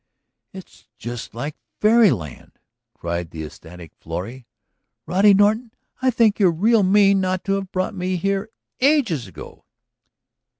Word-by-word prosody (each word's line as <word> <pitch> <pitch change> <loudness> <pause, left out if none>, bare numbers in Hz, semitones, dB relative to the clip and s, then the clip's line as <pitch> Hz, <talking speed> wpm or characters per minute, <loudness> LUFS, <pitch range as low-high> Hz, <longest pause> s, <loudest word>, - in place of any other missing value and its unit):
"It's 190 - -14
just 120 -2 -7
like 145 +5 -5 0.2
fairy 220 0 +5
land!" 75 - -5 0.4
cried 85 0 -4
the 80 -1 -7
ecstatic 80 +2 -12
Florrie. 115 +10 -7 0.6
"Roddy 195 +3 +4
Norton, 215 +4 +2 0.3
I 260 - +3
think 225 -4 +2
you're 195 -3 +5
real 210 +7 +2
mean 195 0 +4
not 185 0 -2
to 195 - -1
have 195 -1 -3
brought 185 +3 -2
me 185 -1 -2
here 195 +4 -2 0.3
ages 245 - +2
ago!" 95 - -12
185 Hz, 135 wpm, -21 LUFS, -, 0.6 s, fairy